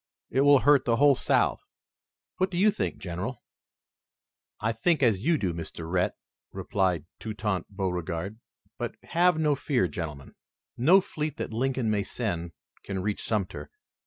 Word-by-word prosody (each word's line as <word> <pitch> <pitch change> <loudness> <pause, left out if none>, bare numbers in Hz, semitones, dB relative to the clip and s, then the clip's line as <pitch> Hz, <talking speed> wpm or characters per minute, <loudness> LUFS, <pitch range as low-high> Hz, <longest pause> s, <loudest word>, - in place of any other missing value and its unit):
It 135 - +2
will 145 -1 +6
hurt 145 -1 +5
the 115 - +3
whole 145 +3 +6
South. - - +1 0.8
What 185 +1 +1
do 175 - -4
you 210 +4 +5
think, 90 - -3
General?" 95 +7 -5 1.2
"I 110 +2 0
think 140 +7 +1
as 110 -6 +4
you 165 +3 +3
do, 95 - -1
Mr. 80 0 -7
Rhett," 90 +1 0 0.4
replied 90 -6 0
Toutant 105 -3 -3
Beauregard. 90 +1 -3 0.4
"But - - -3
have 175 0 +3
no 155 -2 +3
fear, 130 -7 +1
gentlemen. 75 -4 -6 0.4
No 170 +11 +6
fleet 150 -4 -4
that - - -4
Lincoln 125 -1 0
may 105 -1 +1
send 85 -7 -3 0.3
can 95 -2 -4
reach 105 0 -2
Sumter. 90 -9 -2
110 Hz, 150 wpm, -27 LUFS, 90-140 Hz, 1.2 s, will